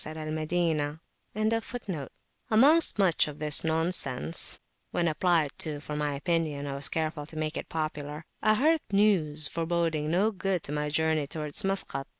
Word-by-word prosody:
[FN#12] 155 Hz, 0 st, -1 dB, 1.5 s
Amongst 285 Hz, +9 st, +5 dB
much 185 Hz, -7 st, +3 dB
of 150 Hz, -1 st, -7 dB
this 150 Hz, -1 st, +3 dB
nonsense, 160 Hz, -3 st, 0 dB, 0.3 s
when 175 Hz, -1 st, 0 dB
applied 160 Hz, -2 st, +2 dB
to 150 Hz, -2 st, -2 dB
for 150 Hz, 0 st, -6 dB
my 150 Hz, -1 st, -1 dB
opinion, 150 Hz, -1 st, -1 dB
I 140 Hz, -, -4 dB
was 140 Hz, +1 st, +1 dB
careful 155 Hz, -2 st, -2 dB
to 160 Hz, -, -11 dB
make 155 Hz, 0 st, -2 dB
it -, -, -5 dB
popular, 155 Hz, -1 st, -4 dB, 0.2 s
I 215 Hz, 0 st, +4 dB
heard 310 Hz, +6 st, +3 dB
news 170 Hz, -8 st, +3 dB
foreboding 165 Hz, -2 st, -1 dB
no 195 Hz, +7 st, +2 dB
good 190 Hz, -3 st, -1 dB
to -, -, -5 dB
my 150 Hz, 0 st, -1 dB
journey 155 Hz, -1 st, +1 dB
towards 150 Hz, +4 st, -3 dB
Maskat. 195 Hz, -8 st, -1 dB
160 Hz, 150 wpm, -28 LUFS, 150-175 Hz, 1.5 s, Amongst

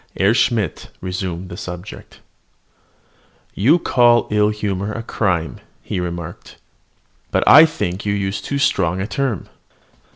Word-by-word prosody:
Herr 100 Hz, +3 st, +3 dB
Schmidt 115 Hz, -6 st, 0 dB
resumed 90 Hz, -1 st, -4 dB
the 85 Hz, -, -8 dB
subject. 90 Hz, 0 st, -9 dB, 1.3 s
"You 125 Hz, -, +4 dB
call 120 Hz, -7 st, +3 dB
ill 105 Hz, 0 st, +3 dB
humour 100 Hz, -1 st, -3 dB
a 115 Hz, +1 st, -5 dB
crime," 90 Hz, -8 st, -1 dB, 0.2 s
he -, -, -3 dB
remarked, 85 Hz, -1 st, -6 dB, 0.7 s
"but -, -, +1 dB
I 155 Hz, +4 st, +9 dB
think 100 Hz, -, -4 dB
you 100 Hz, -, -1 dB
use 95 Hz, -1 st, -2 dB
too 140 Hz, -, -3 dB
strong 95 Hz, -10 st, +1 dB
a 95 Hz, -, -2 dB
term." 130 Hz, -, -2 dB
100 Hz, 130 wpm, -19 LUFS, 90-115 Hz, 1.3 s, I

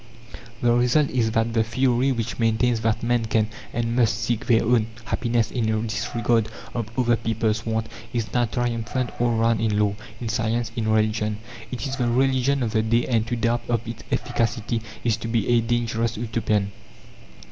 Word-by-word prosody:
The 120 Hz, -1 st, +4 dB
result 125 Hz, +4 st, +3 dB
is, 120 Hz, -3 st, +1 dB
that 115 Hz, +1 st, 0 dB
the 115 Hz, -1 st, +3 dB
theory 125 Hz, +3 st, +2 dB
which 115 Hz, -1 st, -3 dB
maintains 115 Hz, +1 st, +2 dB
that 110 Hz, 0 st, 0 dB
men 120 Hz, -1 st, +1 dB
can, 110 Hz, -1 st, +1 dB, 0.2 s
and 115 Hz, 0 st, -1 dB
must, 115 Hz, -3 st, +3 dB
seek 115 Hz, -1 st, -1 dB
their 115 Hz, -2 st, +4 dB
own 115 Hz, -1 st, +3 dB, 0.2 s
happiness 120 Hz, -2 st, 0 dB
in 115 Hz, -3 st, 0 dB
a 110 Hz, 0 st, +1 dB
disregard 115 Hz, 0 st, 0 dB, 0.2 s
of 115 Hz, -3 st, -3 dB
other 120 Hz, -2 st, +3 dB
people's 115 Hz, 0 st, -1 dB
wants 110 Hz, 0 st, -1 dB, 0.2 s
is 115 Hz, -3 st, -3 dB
now 120 Hz, -1 st, +3 dB
triumphant 120 Hz, +1 st, -2 dB
all 120 Hz, -1 st, +2 dB
round 115 Hz, 0 st, +2 dB
in 110 Hz, -2 st, +1 dB
law, 105 Hz, -1 st, +2 dB, 0.3 s
in 120 Hz, -, -4 dB
science, 115 Hz, 0 st, -1 dB
in 115 Hz, -3 st, -1 dB
religion. 110 Hz, -1 st, +1 dB, 0.3 s
It 125 Hz, +2 st, -4 dB
is 135 Hz, 0 st, -3 dB
the 125 Hz, -3 st, +1 dB
religion 130 Hz, +2 st, +2 dB
of 115 Hz, -, -1 dB
the 110 Hz, -1 st, +2 dB
day, 115 Hz, +2 st, +2 dB
and 115 Hz, -3 st, +1 dB
to 120 Hz, -, -1 dB
doubt 115 Hz, +1 st, +1 dB
of 115 Hz, -1 st, 0 dB
its 115 Hz, -1 st, -6 dB
efficacy 115 Hz, 0 st, -1 dB, 0.2 s
is 115 Hz, -3 st, +2 dB
to -, -, -5 dB
be 115 Hz, -2 st, 0 dB
a 120 Hz, -1 st, +4 dB
dangerous 115 Hz, -1 st, 0 dB
Utopian. 110 Hz, -3 st, 0 dB
115 Hz, 185 wpm, -24 LUFS, 110-120 Hz, 0.3 s, The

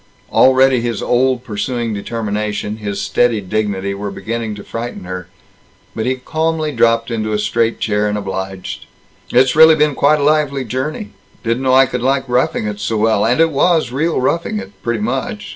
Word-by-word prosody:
Already 130 Hz, -1 st, +5 dB
his 115 Hz, -3 st, -3 dB
old 125 Hz, 0 st, +1 dB
pursuing 115 Hz, +1 st, -3 dB
determination, 105 Hz, 0 st, -3 dB
his 100 Hz, -2 st, -4 dB
steady 110 Hz, +3 st, +1 dB
dignity, 100 Hz, -1 st, -2 dB
were 100 Hz, +1 st, -5 dB
beginning 110 Hz, +3 st, -4 dB
to 105 Hz, -, -9 dB
frighten 115 Hz, -2 st, -6 dB
her. 90 Hz, -1 st, -6 dB, 0.7 s
But 110 Hz, +1 st, -2 dB
he 130 Hz, -, +1 dB
calmly 155 Hz, +3 st, -2 dB
dropped 115 Hz, -2 st, +2 dB
into 110 Hz, -2 st, -2 dB
a -, -, +1 dB
straight 115 Hz, +2 st, 0 dB
chair, 105 Hz, -1 st, 0 dB
and 105 Hz, 0 st, -1 dB
obliged: 95 Hz, -2 st, -5 dB, 0.4 s
"It's 125 Hz, +1 st, +4 dB
really 160 Hz, 0 st, +8 dB
been 150 Hz, -1 st, +2 dB
quite 150 Hz, +3 st, +3 dB
a -, -, 0 dB
lively 145 Hz, -3 st, +1 dB
journey. 135 Hz, -, -4 dB, 0.3 s
Didn't 115 Hz, +2 st, -1 dB
know 130 Hz, -1 st, +3 dB
I 135 Hz, 0 st, +7 dB
could 125 Hz, -1 st, -4 dB
like 135 Hz, +1 st, 0 dB
roughing 125 Hz, -3 st, 0 dB
it 105 Hz, -1 st, -4 dB
so 110 Hz, +2 st, -1 dB
well. 110 Hz, -1 st, +2 dB
And 120 Hz, +6 st, +2 dB
it 165 Hz, 0 st, +4 dB
was 155 Hz, 0 st, +2 dB
real 160 Hz, +6 st, 0 dB
roughing 130 Hz, -1 st, 0 dB
it, 95 Hz, -1 st, -7 dB
pretty 120 Hz, -2 st, -2 dB
much. 135 Hz, -, -3 dB
115 Hz, 180 wpm, -17 LUFS, 105-135 Hz, 0.7 s, really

